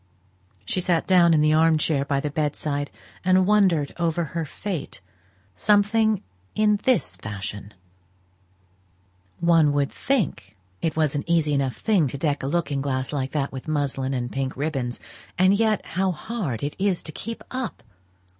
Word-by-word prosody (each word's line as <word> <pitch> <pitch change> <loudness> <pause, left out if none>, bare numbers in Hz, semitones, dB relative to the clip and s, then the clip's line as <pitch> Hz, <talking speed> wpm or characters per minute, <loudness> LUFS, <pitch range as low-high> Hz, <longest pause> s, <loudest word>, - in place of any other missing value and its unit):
She 185 - -1
sate 175 -2 +1
down 180 -2 +5
in 155 -2 +4
the 155 0 +4
arm 160 0 +4
chair 150 -2 +1
by 140 -1 0
the 145 +1 -3
bed 150 -1 -1
side, 145 -1 -2 0.3
and 185 0 +4
wondered 185 -8 +3
over 170 0 +1
her 165 -1 -1
fate 175 - -5 0.6
something 210 - +3 0.3
in 210 -1 +3
this 255 -3 +2
fashion 105 -1 -6 1.7
"One 165 -4 +4
would 140 -1 +1
think 180 - -2 0.2
it 160 -2 -1
was 155 -3 +1
an 145 - -2
easy 165 -3 +2
enough 135 -4 0
thing 195 -9 +2
to 135 - -5
deck 145 0 0
a 135 - -3
looking 145 -3 -1
glass 130 0 -2
like 135 -2 -2
that 140 -2 -1
with 130 +2 -8
muslin 135 -3 -1
and 120 -1 -3
pink 135 -1 -3
ribbons; 135 -5 -2 0.4
and 185 +2 +5
yet 215 0 +1
how 190 +1 0
hard 165 - -4
it 145 - -3
is 195 -2 +1
to 155 - -7
keep 230 +8 -6
it - - -16
up! 255 - -4
155 Hz, 165 wpm, -24 LUFS, 140-185 Hz, 1.7 s, down